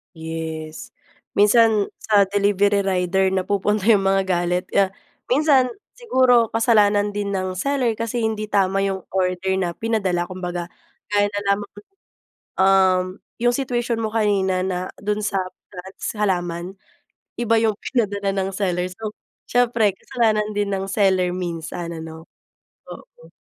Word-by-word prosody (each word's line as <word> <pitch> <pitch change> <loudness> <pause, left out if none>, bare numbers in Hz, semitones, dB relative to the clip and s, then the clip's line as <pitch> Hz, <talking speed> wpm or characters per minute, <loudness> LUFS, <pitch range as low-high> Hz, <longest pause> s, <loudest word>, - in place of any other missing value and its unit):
Yes. 160 -1 -6 0.4
Minsan, 215 0 +4
sa 200 -3 +2
delivery 200 0 +2
rider 190 0 +1
napupunta 200 +3 0
yung 200 -3 +4
mga 195 0 +3
galit 175 +1 +1
kaya, 195 -1 +2 0.3
minsan, 275 -1 +4 0.3
siguro, 255 - +3
kasalanan 210 -3 +3
din 205 -1 -3
ng 185 -1 -2
seller 275 +3 0
kasi 230 +1 -2
hindi 220 -1 -1
tama 195 -1 +1
yung 190 -1 -2
order 190 0 0
na 175 -2 -1
pinadala, 190 -5 -1
kumbaga, 175 -1 -5 0.4
gaya 205 0 +3
na 205 - -2
lamang 200 0 0 0.9
um, 190 -1 +4 0.4
yung 240 +1 +2
situation 240 -3 -1
mo 215 - -2
kanina 200 -4 +1
na 185 0 -3
dun 210 +1 -2
sa 200 -2 0 0.3
plants, 190 +3 -7
halaman, 175 -2 -1 0.6
iba 230 -1 +1
yung 215 -2 +1
pinadala 205 -5 -1
ng 195 0 -1
seller, 180 -2 -1
so 215 +3 -7 0.3
siyempre, 235 -4 +2
kasalanan 215 -2 0
din 205 0 -1
ng 195 0 -3
seller 190 -2 +2
minsan, 170 -1 -5
ano? 160 0 -9 0.6
Oo. - - -13
200 Hz, 130 wpm, -22 LUFS, 185-215 Hz, 0.9 s, Minsan